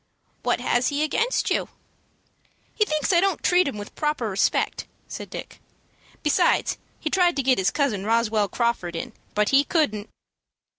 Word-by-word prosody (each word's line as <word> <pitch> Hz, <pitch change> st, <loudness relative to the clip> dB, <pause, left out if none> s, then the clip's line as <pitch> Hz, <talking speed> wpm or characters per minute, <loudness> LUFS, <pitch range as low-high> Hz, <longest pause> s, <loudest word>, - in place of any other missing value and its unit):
"What -, -, 0 dB
has 240 Hz, +1 st, +1 dB
he 290 Hz, +1 st, 0 dB
against 460 Hz, +11 st, 0 dB
you?" -, -, 0 dB, 1.0 s
"He 425 Hz, -, +2 dB
thinks 305 Hz, 0 st, 0 dB
I 340 Hz, -, +6 dB
don't 390 Hz, -2 st, 0 dB
treat 360 Hz, -2 st, +4 dB
him 270 Hz, -, -4 dB
with 205 Hz, 0 st, -8 dB
proper 300 Hz, -8 st, -1 dB
respect," 190 Hz, -, 0 dB, 0.2 s
said -, -, -7 dB
Dick. -, -, -9 dB, 0.6 s
"Besides 345 Hz, +4 st, +2 dB, 0.2 s
he 310 Hz, -, -3 dB
tried 355 Hz, -2 st, +3 dB
to 275 Hz, -, 0 dB
get 255 Hz, -3 st, +3 dB
his 190 Hz, 0 st, +2 dB
cousin 240 Hz, -7 st, 0 dB
Roswell 220 Hz, -1 st, +1 dB
Crawford 215 Hz, -5 st, -1 dB
in, 190 Hz, +8 st, -5 dB, 0.2 s
but 210 Hz, 0 st, +2 dB
he 275 Hz, +1 st, +5 dB
couldn't." 245 Hz, -, 0 dB
270 Hz, 160 wpm, -24 LUFS, 210-310 Hz, 1.0 s, I